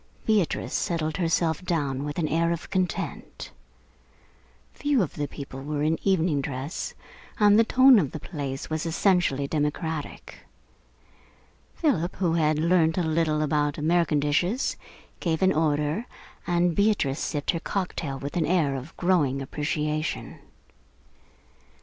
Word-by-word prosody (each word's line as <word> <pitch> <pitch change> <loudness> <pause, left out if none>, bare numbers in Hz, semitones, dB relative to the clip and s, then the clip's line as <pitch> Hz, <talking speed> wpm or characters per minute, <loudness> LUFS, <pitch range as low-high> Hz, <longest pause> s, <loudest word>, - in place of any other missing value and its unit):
Beatrice 210 -6 +1
settled 160 -2 -1
herself 165 -1 0
down 145 -6 -1
with 145 0 -5
an 165 -3 0
air 165 +2 +1
of 170 -1 -5
content. 185 -2 -3 1.2
Few 290 -3 +1
of 165 - -5
the 145 -1 -3
people 135 -1 -8
were 145 +1 -2
in 160 +1 +1
evening 170 -6 +2
dress, 135 +2 -5 0.4
and 210 0 +6
the - - +7
tone 255 +1 +6
of 150 -8 0
the 155 - -7
place 140 -4 -5
was 155 +1 -2
essentially 165 -5 +2
democratic. 150 +1 -3 1.4
Philip, 190 - 0
who 175 -4 0
had 155 -2 +2
learnt 165 0 +2
a 180 - +2
little 155 -1 +1
about 145 -1 0
American 160 0 +2
dishes, 175 - 0 0.4
gave 165 0 -1
an 190 0 +4
order, 155 +7 0 0.4
and 175 -1 +2
Beatrice 200 -9 +1
sipped 145 -2 -1
her 170 - -3
cocktail 170 -7 -3
with 140 +2 -6
an 165 -3 +1
air 160 -5 +2
of 135 +5 -8
growing 160 -7 +2
appreciation. 150 +2 -3
160 Hz, 135 wpm, -26 LUFS, 145-180 Hz, 1.4 s, the